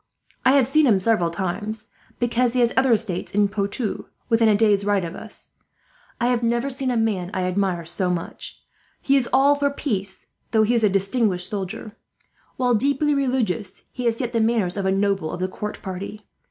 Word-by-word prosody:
"I 260 - +5
have 270 -4 +4
seen 305 +2 +4
him 205 -5 +4
several 190 -4 +2
times, 205 +5 -4 0.3
because 240 0 +1
he 250 - +2
has 235 0 +2
other 260 -1 +3
estates 210 -5 -1
in 205 0 +4
Poitou, 200 +2 -3 0.2
within 225 -1 +4
a 210 - +4
day's 205 -2 +3
ride 200 -3 +1
of 165 - -6
us. 220 - -10 0.7
I 235 - +1
have 245 -1 +1
never 235 +3 0
seen 265 0 -2
a 245 - 0
man 205 -6 0
I 185 - 0
admire 180 -2 -1
so 180 +2 -2
much. 175 -2 -5 0.4
He 275 - +2
is 260 -3 +2
all 275 +3 +5
for 285 0 +1
peace, 200 -9 -3 0.2
though 220 -1 +3
he 225 +3 +2
is 230 -2 +1
a 210 - +5
distinguished 195 -1 0
soldier. 205 +2 -5 0.6
While 250 -1 +2
deeply 280 +5 +2
religious, 250 -8 -1
he 250 - -5
has 230 -1 +1
yet 245 -2 -3
the 230 - +2
manners 220 -5 +1
of 200 -2 -1
a - - +2
noble 195 -4 0
of - - -5
the 185 - 0
court 210 +3 -6
party. 200 +2 -6
215 Hz, 200 wpm, -23 LUFS, 195-245 Hz, 0.7 s, I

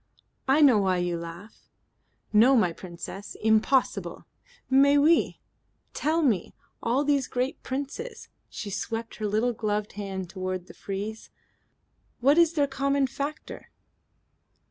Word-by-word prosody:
"I 275 +4 +4
know 260 -7 +7
why 190 -2 +2
you 175 -1 -1
laugh." 170 +5 -10 0.6
"No, 235 +6 +6
my 180 -8 +3
Princess. 180 +3 -8
Impossible." 220 +4 +1 0.4
"Mais 280 +2 +5
oui. 315 +3 +3 0.5
Tell 320 +2 +1
me. 215 - 0 0.3
All 250 +5 +1
these 280 -3 +1
great 255 +2 -2
princes" 285 - -5 0.2
she 205 - -6
swept 225 +3 -4
her 215 - -2
little 220 +4 +1
gloved 210 -2 -2
hand 195 -2 -5
toward 185 -1 -4
the - - -13
frieze. 205 +3 -6 0.9
"What 280 +6 +4
is 335 -1 +5
their 290 -3 +2
common 275 0 +1
factor?" 285 +3 -6
230 Hz, 125 wpm, -27 LUFS, 200-280 Hz, 0.9 s, know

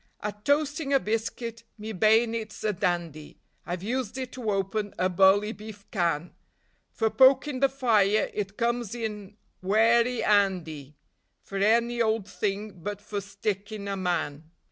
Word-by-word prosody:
At 210 0 -5
toasting 290 0 +1
a 275 - +5
biscuit 230 +1 -3
me 215 +1 -6
bay'nit's 220 +1 +2
a 215 -1 +1
dandy; 170 -4 -3 0.3
I've 175 +1 -4
used 245 +1 -2
it 260 -1 -4
to 245 -4 -4
open 200 +1 -1
a 185 - +1
bully 195 +3 +4
beef 210 -2 -10
can; 170 -4 -1 0.6
For 220 -1 0
pokin' 265 +1 +4
the 275 0 +4
fire 215 -6 +2
it 200 -1 -4
comes 235 -2 -1
in 210 -3 -5 0.2
werry 230 +5 +3
'andy; 165 -9 +1 0.5
For 195 - -5
any 235 +3 +3
old 220 -3 +1
thing 200 -3 -3
but 205 +2 -4
for 205 0 -5
stickin' 205 +1 -4
a 200 - -2
man. 165 -5 -2
210 Hz, 145 wpm, -27 LUFS, 195-230 Hz, 0.6 s, a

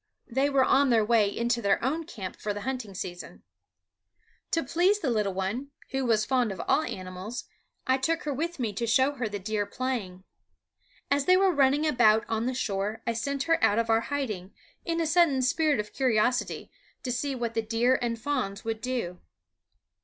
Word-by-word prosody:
They 270 +3 +1
were 275 -2 +3
on 275 +1 +4
their 225 -3 +4
way 220 -2 +3
in 235 +3 -2
to 240 0 +1
their 200 0 +1
own 310 +6 -1
camp 200 - -7
for 205 -1 -3
the 205 - -5
hunting 245 -5 -4
season. 175 -1 -7 1.1
To 330 - +1
please 350 +9 +2
the 280 -10 -1
little 210 -4 0
one, 205 +9 -2 0.2
who 270 -1 -1
was 220 -3 +2
fond 250 -5 +1
of 190 - -7
all 300 - +4
animals, 185 -2 -6 0.4
I 260 0 +2
took 325 +5 0
her 295 - -2
with 335 +5 -3
me 230 -6 -2
to 235 +4 -2
show 260 +5 +4
her 250 -6 -3
the 205 - -4
deer 205 +1 -2
playing. 220 -8 -4 0.9
As 280 0 +2
they 365 0 +6
were 380 -1 +4
running 285 +1 +3
about 230 -7 +4
on 225 +1 -1
the 255 - -1
shore 210 -2 -2
I 235 - 0
sent 275 +4 -2
her 330 +1 +1
out 205 - +4
of 230 0 +1
our 225 0 +4
hiding, 220 -10 -4 0.3
in 335 -1 -1
a 330 - +1
sudden 315 -5 +3
spirit 305 0 +2
of 210 0 -4
curiosity, 245 -2 0 0.3
to 250 - -2
see 270 +3 -2
what 235 -2 -3
the 225 - 0
deer 230 +4 +2
and 235 -1 -1
fawns 225 -6 -2
would 225 -1 -3
do. 235 -9 -3
240 Hz, 200 wpm, -28 LUFS, 215-280 Hz, 1.1 s, they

